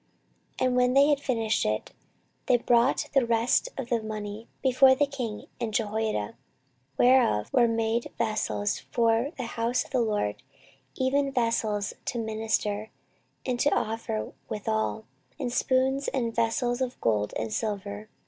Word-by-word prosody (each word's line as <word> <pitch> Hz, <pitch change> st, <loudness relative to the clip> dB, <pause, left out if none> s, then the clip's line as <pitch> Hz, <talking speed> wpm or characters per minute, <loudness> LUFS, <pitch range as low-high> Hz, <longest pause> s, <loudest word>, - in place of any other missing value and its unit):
14:024:014 255 Hz, -, +2 dB
And 250 Hz, -, 0 dB
when 250 Hz, 0 st, +3 dB
they 280 Hz, +1 st, +7 dB
had 290 Hz, -2 st, +3 dB
finished 225 Hz, -6 st, 0 dB
it, 110 Hz, 0 st, -2 dB, 0.6 s
they 245 Hz, -, +5 dB
brought 240 Hz, +2 st, +2 dB
the 270 Hz, -2 st, +4 dB
rest 235 Hz, -, +2 dB
of 265 Hz, -3 st, -5 dB
the 235 Hz, -2 st, +1 dB
money 215 Hz, 0 st, -6 dB, 0.2 s
before 260 Hz, 0 st, +6 dB
the 290 Hz, -, +3 dB
king 250 Hz, -7 st, -5 dB
and 225 Hz, -3 st, -3 dB
Jehoiada, 215 Hz, -, -1 dB, 0.6 s
whereof 245 Hz, -, +4 dB
were 240 Hz, -2 st, +5 dB
made 230 Hz, +1 st, 0 dB
vessels 215 Hz, -2 st, -1 dB
for 230 Hz, +2 st, +1 dB
the 255 Hz, -, -3 dB
house 235 Hz, +1 st, -1 dB
of -, -, -17 dB
the 255 Hz, -3 st, +2 dB
LORD, 210 Hz, -, -1 dB, 0.5 s
even 275 Hz, +2 st, +1 dB
vessels 225 Hz, -5 st, 0 dB
to -, -, -2 dB
minister, 220 Hz, -1 st, -1 dB, 0.6 s
and 250 Hz, -2 st, -1 dB
to 290 Hz, -, +4 dB
offer 225 Hz, 0 st, -2 dB, 0.2 s
withal, 110 Hz, -, -2 dB, 0.3 s
and 245 Hz, -, -2 dB
spoons, 265 Hz, +2 st, +1 dB
and 235 Hz, -4 st, -1 dB
vessels 240 Hz, +2 st, 0 dB
of 255 Hz, -1 st, -2 dB
gold 105 Hz, -2 st, 0 dB
and 110 Hz, -1 st, -3 dB
silver. 205 Hz, 0 st, -3 dB
230 Hz, 150 wpm, -27 LUFS, 215-255 Hz, 0.6 s, they